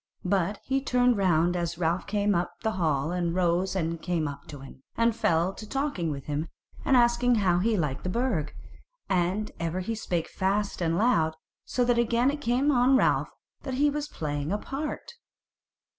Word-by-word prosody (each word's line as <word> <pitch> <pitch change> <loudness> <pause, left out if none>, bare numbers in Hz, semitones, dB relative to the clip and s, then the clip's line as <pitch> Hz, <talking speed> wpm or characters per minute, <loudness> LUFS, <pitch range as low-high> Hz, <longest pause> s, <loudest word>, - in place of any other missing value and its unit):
But 195 +1 +1
he 270 0 0
turned 250 -2 +3
round 175 -2 +2
as 170 -1 -2
Ralph 170 +1 0
came 205 0 +1
up 175 -1 -2
the 220 - +1
hall 155 -6 0
and 175 -1 -1
rose 180 +1 +1
and 165 -2 -2
came 170 -3 -1
up 140 0 -8
to 145 -2 -9
him, 135 -1 -12 0.2
and 230 -1 +3
fell 170 -4 +1
to 215 +1 -10
talking 270 - -1
with 140 -3 -5
him 150 +2 -2 0.4
and 265 - +4
asking 240 0 +4
him 215 - +1
how 175 -2 +3
he 220 +3 +1
liked 150 -6 -1
the 185 - -2
Burg; 210 - -1 0.6
and 185 +3 0
ever 165 +2 -2
he 225 +5 -3
spake 175 -6 -2
fast 200 +1 -1
and 165 0 +1
loud, 165 -9 +2 0.3
so 245 0 0
that 240 -1 +2
again 235 +3 +2
it 295 0 -6
came 260 +3 +2
on 260 0 +4
Ralph - - +2 0.3
that 265 -2 -4
he 290 +2 +3
was 295 0 -3
playing 145 - -3
a 205 - +1
part. 280 +7 -5
190 Hz, 190 wpm, -27 LUFS, 165-240 Hz, 0.6 s, and